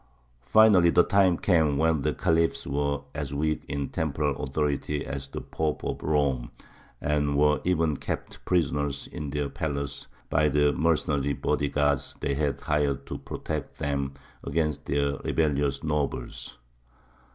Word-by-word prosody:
Finally 100 - +6
the 90 - +5
time 95 -3 +3
came 80 -6 +3
when 80 -1 +2
the - - +1
Khalifs 80 0 +1
were 70 +1 -1
as 70 -1 -4
weak 75 +1 0
in 70 -1 -3
temporal 75 -3 -1
authority 75 +1 -1
as 70 0 -5
the - - -6
Pope 75 -2 -2
of - - -3
Rome, 70 -5 +1 0.5
and 75 -1 0
were 75 -1 +3
even 80 -4 +2
kept - - -5
prisoners 75 -5 0
in 75 -1 -6
their 75 0 -1
palace 70 -1 -4 0.2
by 75 +1 +3
the 75 +1 +3
mercenary 75 -3 +1
body 70 0 0
guard 70 -2 +2 0.2
they 70 - -1
had 70 0 -1
hired 75 -2 0
to - - -6
protect 75 -3 -5
them 70 -1 -2 0.3
against 75 -1 -1
their 70 0 +1
rebellious 70 -3 0
nobles. 75 -5 -3
75 Hz, 140 wpm, -27 LUFS, 70-80 Hz, 0.5 s, Finally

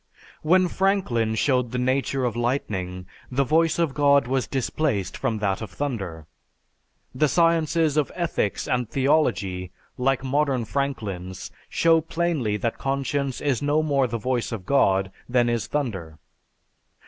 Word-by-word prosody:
When 180 +4 +4
Franklin 175 - +1
showed 125 0 +1
the 125 - -3
nature 130 +1 0
of 120 - -1
lightning, 100 -7 -2 0.3
the 135 +2 +2
voice 160 +3 +2
of 165 -5 +1
God 140 -2 +4
was 130 +1 -1
displaced 130 - -1
from 110 - -1
that 100 -1 -1
of 110 - -5
thunder. 95 - -4 0.9
The 150 +4 +2
sciences 165 -1 +2
of 150 - +1
ethics 170 - -1
and 125 -3 -1
psychology, 130 - +1 0.3
like 135 +1 +1
modern 135 -2 +1
Franklins, 100 -9 -4 0.2
show 165 -1 +3
plainly 160 -10 -1
that 115 +3 -2
conscience 135 0 -2
is 140 -5 0
no 145 +2 +2
more 140 -4 +2
the 115 - -3
voice 125 +1 -1
of 105 -6 -5
God 95 -8 +2 0.2
than 120 -1 +3
is 120 -3 -1
thunder. 95 - -3
130 Hz, 140 wpm, -24 LUFS, 110-145 Hz, 0.9 s, When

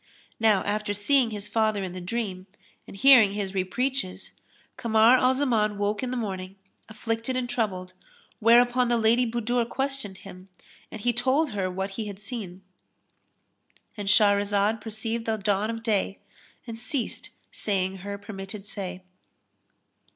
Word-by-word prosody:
Now 220 -3 +4
after 205 0 -1
seeing 245 +4 +3
his 205 -2 -6
father 215 -3 +1
in 185 - -4
the 185 - -6
dream 190 -1 -4 0.4
and - - -10
hearing 225 -4 +7
his 200 -2 -3
re 190 -1 +1
preaches, 250 0 -3 0.4
Kamar 230 +1 +5
al 255 +1 +3
Zaman 230 -6 +1
awoke 205 0 -1
in 255 - -2
the 255 - -2
morning, 190 -4 -4 0.3
afflicted 225 +3 -3
and 255 -1 -1
troubled, 195 -7 -2 0.5
whereupon 245 +2 +5
the 240 0 +2
Lady 230 +2 +3
Budur 240 +1 0
questioned 270 -8 -3
him 190 -1 -12 0.4
and 220 - -8
he 240 +2 +1
told 265 +6 +1
her 195 -3 -1
what 190 +2 -3
he 215 +2 -5
had 200 -1 -7
seen.—And 195 0 -12
Shahrazad 205 +1 +3
perceived 225 +1 -4
the 220 -1 +1
dawn 205 +1 0
of 225 0 -4
day 205 -3 0 0.5
and 225 -1 -7
ceased 250 0 -3 0.2
saying 190 -2 -1
her 200 +2 -6
permitted 200 0 -8
say. 190 -3 -6
215 Hz, 145 wpm, -26 LUFS, 195-235 Hz, 0.5 s, hearing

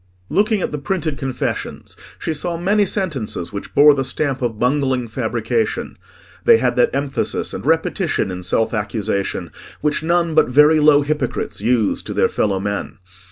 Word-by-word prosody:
Looking 210 -1 +1
at - - -2
the 150 - -4
printed 155 -2 -3
confessions, 135 -3 -4 0.2
she 160 - -3
saw 170 +3 -2
many 200 +4 +2
sentences 135 - -2
which 100 - -7
bore 145 +1 +7
the 135 -1 -1
stamp 135 0 -2
of 120 -3 -2
bungling 130 0 0
fabrication: 440 - -2 0.5
they 465 -1 +6
had - - 0
that - - +3
emphasis 140 -1 -2
and - - -5
repetition 160 - 0
in 90 0 -6
self 110 +6 0
accusation 105 -1 -2 0.3
which 150 0 0
none 170 0 +1
but 155 -3 +4
very 150 +4 +5
low 150 -1 +5
hypocrites 140 -8 -3
use 115 -2 +1
to - - -7
their - - +3
fellow 100 -3 0
men. 100 +1 -4
145 Hz, 160 wpm, -19 LUFS, 115-160 Hz, 0.5 s, bore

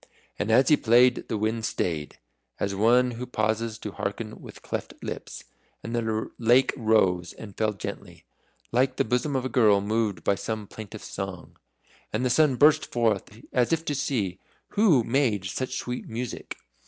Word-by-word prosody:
And 105 - -1
as 125 +4 +5
he 150 - +6
played 125 +2 +4
the 110 - -2
wind 110 +2 -1
stayed, 80 -8 -2 0.4
as 100 - -1
one 120 +5 +4
who 125 +1 -6
pauses 110 -1 -1
to 105 -2 -6
hearken 105 +3 -5
with - - -12
cleft - - -5
lips, - - -6 0.4
and 115 +1 -4
the 110 -2 -1
lake 120 +3 +4
rose 95 -7 +2
and 100 -3 -11
fell 110 -1 0
gently, 100 - -8 0.5
like 130 +2 +2
the - - +1
bosom 125 +5 0
of 130 -1 0
a - - +1
girl 110 -6 +4
moved 105 -4 -1
by - - +3
some 110 +1 -4
plaintive 110 +1 -9
song, 95 -2 -6 0.6
and 125 - -1
the 125 - +2
sun 145 0 +4
burst 150 +4 +4
forth 110 -2 0
as 125 +1 +2
if 165 0 0
to 145 - -1
see 120 -10 -1 0.3
who 190 - +4
made 115 -6 +1
such 130 +7 -3
sweet 125 0 -5
music. 120 +2 -5
115 Hz, 170 wpm, -26 LUFS, 105-125 Hz, 0.6 s, he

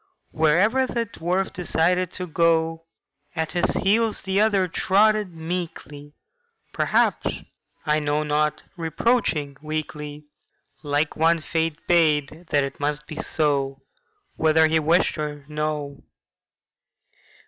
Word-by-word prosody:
Wherever 200 +12 +3
the 235 -2 -1
dwarf 185 -1 -2
decided 180 +1 0
to 180 - -5
go 165 -1 +1 0.5
At 160 -1 -2
his 175 - +1
heels 220 +3 +2
the 195 +1 +1
other 200 -4 +3
trotted 205 +3 +2
meekly, 160 -4 -6 0.6
(Perhaps—I 150 0 -1
know 150 0 0
not—reproaching 150 - -1
weakly) 150 -1 -5 0.6
Like 145 0 0
one 165 +1 +3
Fate 160 0 -1
bade 160 -1 +2
that 145 -1 +3
it 135 - -5
must 150 +1 -2
be 155 - -8
so, 140 -3 -1 0.5
Whether 160 0 +4
he 160 0 +3
wished 160 +1 +2
or 145 -1 -4
no. 150 -2 -3
160 Hz, 105 wpm, -24 LUFS, 150-180 Hz, 0.6 s, Whether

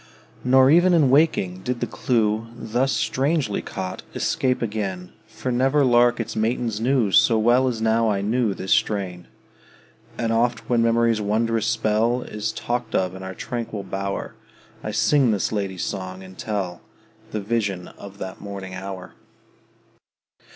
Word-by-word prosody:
Nor 130 +1 +5
even 175 +2 +5
in 145 -6 +4
waking 115 - +2
did 125 +4 -3
the - - 0
clew, 110 -2 0
Thus 120 +3 -1
strangely 135 -5 0
caught, 95 -1 -5
escape 130 -1 0
again; 100 -5 -4
For 130 - -4
never 135 +3 +3
lark 120 -1 +4
its 115 - -4
matins 110 0 -1
knew 120 -4 +2
So 115 +4 +5
well 120 +4 +4
as 115 -3 -2
now 115 0 +3
I 100 -2 0
knew 110 0 0
this 95 - -5
strain. 100 -5 0 0.9
And 115 -1 0
oft 120 +1 0
when 120 -2 +2
memory's 115 -1 +2
wondrous 110 +1 0
spell 115 +2 +1
Is 105 -1 -4
talked 120 -2 -3
of 90 -1 +1
in 95 - -9
our 95 0 -6
tranquil 115 -3 -5
bower, 100 0 -4 0.5
I - - -3
sing 115 +5 +3
this 105 -3 0
lady's 100 -4 -2
song, 95 -1 -5
and 95 0 -12
tell 95 -4 -4 0.5
The 110 - -3
vision 100 -4 -2
of 100 0 -12
that 95 -2 -7
morning 100 -2 -7
hour. 95 0 -7
110 Hz, 150 wpm, -23 LUFS, 100-120 Hz, 0.9 s, Nor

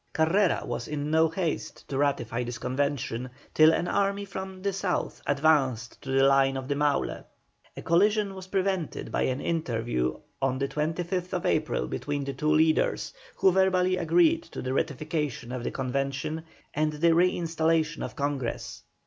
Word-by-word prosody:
Carrera 170 +4 +2
was - - -4
in 150 0 -3
no 160 +1 +4
haste 165 -1 -3
to 140 - -5
ratify 120 -5 0
this 120 0 -5
convention, 130 -2 -2 0.2
till 155 +1 +7
an 175 - 0
army 200 +1 0
from 190 -1 -7
the 200 -1 0
South 185 -1 -2
advanced 140 -6 +1
to 135 - -9
the 135 0 +3
line 135 0 +4
of 130 -1 -5
the 140 - 0
Maule. 145 0 0 0.5
A - - -6
collision 205 +4 +3
was 190 -1 -9
prevented 190 -3 -2
by - - 0
an 130 +1 0
interview 120 - -1 0.2
on 130 -1 +1
the 140 +1 -1
25th 175 +4 -2
April 155 0 +1
between 145 -1 -3
the 140 0 -4
two 150 +4 0
leaders, 155 +1 +2 0.2
who 190 - +4
verbally 185 0 +3
agreed 170 -1 +3
to - - -8
the 130 0 -2
ratification 145 -3 -2
of 125 -1 -4
the - - -1
convention 140 +4 -2 0.3
and 155 +1 0
the 165 +2 +3
re 175 +2 +5
installation 165 -1 0
of - - -5
Congress. 125 -6 -3
155 Hz, 165 wpm, -27 LUFS, 135-175 Hz, 0.5 s, till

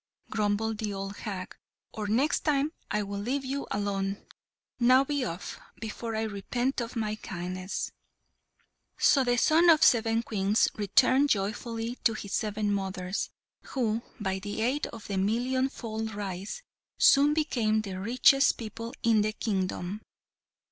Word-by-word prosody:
grumbled 215 +1 0
the 215 -2 -2
old 195 0 -5
hag, 190 -4 -6 0.4
"or 215 -1 -4
next 255 +9 +2
time 295 0 +1 0.2
I'll 210 -1 0
leave 220 +8 -2
you 275 +2 -3
alone. 200 -1 -2 0.5
Now 255 +2 +6
be 285 -1 -1
off, 180 -5 -5 0.2
before 225 +1 -5
I 220 - 0
repent 240 +5 -2
of 235 +1 -5
my 215 -2 -1
kindness!" 185 -2 -4 1.1
So 275 - +5
the 245 -1 +1
son 325 +7 +5
of 315 -2 +6
seven 225 -1 +4
Queens 205 -1 +2
returned 255 +7 +3
joyfully 225 +3 -2
to 225 - +1
his 200 -2 -6
seven 210 -1 0
mothers, 190 -1 -2 0.3
who, 230 -4 -1 0.2
by 190 -2 -1
the 205 +3 -3
aid 265 +5 0
of 225 -2 -10
the 200 - -2
million 250 +6 +1
fold 220 -4 -5
rice, 200 - -5 0.3
soon 285 +2 +6
became 230 -8 +1
the 195 -3 -6
richest 255 +6 +4
people 230 +1 -7
in 225 -3 +4
the 215 +1 0
kingdom. 195 -2 -2
220 Hz, 140 wpm, -28 LUFS, 200-250 Hz, 1.1 s, Now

